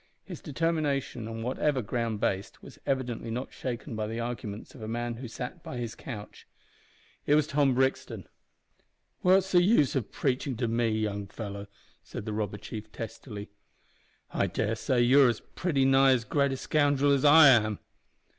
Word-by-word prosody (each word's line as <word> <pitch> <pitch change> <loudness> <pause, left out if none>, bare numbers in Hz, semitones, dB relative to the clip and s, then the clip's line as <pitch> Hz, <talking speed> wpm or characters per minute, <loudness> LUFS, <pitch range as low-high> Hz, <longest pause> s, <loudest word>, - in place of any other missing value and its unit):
His - - -9
determination, 145 -6 -1
on 115 0 -5
whatever 130 +1 0
ground 115 -1 -2
based, 95 -1 -2
was - - -13
evidently 125 -4 -2
not 125 +4 -4
shaken 125 0 -5
by 110 -1 -2
the 115 +2 -4
arguments 115 -3 -5
of 130 - -12
a 110 - -5
man 120 +1 -3
who 125 +1 -7
sat 125 +2 -7
by 125 - -7
his 120 -2 -4
couch. 105 -5 -9 0.8
It 145 - +5
was 155 -1 +3
Tom 140 -3 +2
Brixton. 130 +1 -1 0.9
"What's 190 +1 +4
the 175 - +6
use 175 - +3
o' 135 - +2
preachin' 130 +2 -2
to 120 0 0
me, 115 0 +1
young 105 -2 -2
fellow?" 100 -1 -7 0.4
said - - -7
the 110 - -3
robber 105 -1 -2
chief, 110 +1 -8
testily. 110 -2 -8 0.8
"I - - +1
dare 110 - -1
say 120 +3 0
you 130 +4 +6
are - - +2 0.2
pretty 145 -7 +1
nigh 135 0 +5
as 120 -2 0
great 140 0 +1
a - - -3
scoundrel 145 0 +2
as 140 -2 +2
I 150 0 +9
am." 110 -5 +4
120 Hz, 175 wpm, -28 LUFS, 110-140 Hz, 0.9 s, I